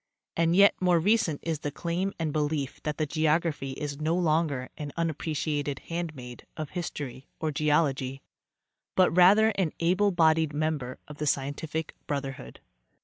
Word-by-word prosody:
and 165 +1 +2
yet 200 +1 +7
more 180 -2 +4
recent 180 -5 +2
is 160 -3 -2
the 145 - -3
claim 170 +6 -2
and 160 -3 -2
belief 150 -3 -1
that 150 -1 -3
geog 155 +1 +2
raphy 140 -5 -3
is 145 +1 -5
no 160 +2 +1
longer 155 -6 0
an 145 -1 -6
unappreciated 150 -3 -1 0.2
handmaid 145 -8 -5
of 155 -2 -5
history 145 -7 -5
or 155 -1 -1
geology, 140 -3 0 0.7
but 185 -3 +5
rather 200 +5 +7
an 190 -7 0
able 185 +5 +3
bodied 160 -4 +3
member 150 -5 -2
of 150 -1 -11
the 150 - -1
scientific 150 +4 -2
brotherhood. 135 - -5
155 Hz, 145 wpm, -28 LUFS, 145-170 Hz, 0.7 s, yet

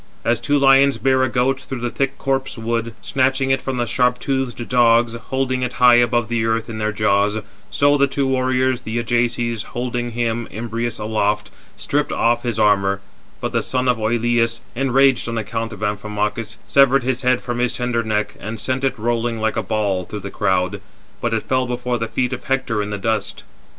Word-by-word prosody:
As 115 -1 +2
two 145 +4 +1
lions 135 0 +5
bear 130 -1 +2
a 130 - +2
goat 130 +2 +1
through 130 -2 -7
the 120 -1 -2
thick 135 +3 -1
copse 135 -1 -2
wood, 115 0 -2
snatching 135 0 +1
it 135 -1 +2
from 135 -1 -3
the 120 - 0
sharp 125 +1 +1
toothed 130 -3 -2
dogs, 120 -1 +4
holding 130 +2 -2
it 125 -1 -2
high 125 -1 +6
above 120 -1 +2
the 115 0 -1
earth 115 +1 0
in 110 - -6
their 105 0 0
jaws; 105 0 +1 0.3
so 145 0 +3
the 140 - +4
two 140 0 -1
warriors, 130 -1 +1
the 110 -1 -4
Ajaces, 120 -1 0
holding 120 0 -4
him 115 -1 -1
[Imbrius] 115 +1 -3
aloft, 105 -1 -1 0.3
stripped - - -1
off 120 0 +2
his 120 -3 -3
armour; 100 -2 +3 0.4
but - - -3
the - - +1
son 130 0 -1
of 125 -2 +3
Oïleus, 115 +1 +1
enraged 135 -1 +3
on 115 - -3
account 115 +1 -3
of 105 -1 -8
Amphimachus, 105 +1 -2
severed 135 -1 +4
his 130 0 -1
head 125 -1 +2
from 120 -1 -4
his 125 0 +1
tender 125 -1 0
neck, 105 -2 -1
and 110 +1 -6
sent 130 +4 -2
it 135 - 0
rolling 115 +1 -1
like 110 0 0
a - - 0
ball 100 -4 -1
through 105 +2 -7
the 100 +1 -7
crowd; 95 0 0 0.4
but 120 - 0
it 115 -1 0
fell 130 -1 0
before 125 0 -2
the 115 - -2
feet 125 +2 -1
of - - -6
Hector 130 -5 0
in 105 - -4
the 105 - -3
dust. 105 0 -2
120 Hz, 200 wpm, -20 LUFS, 110-130 Hz, 0.4 s, high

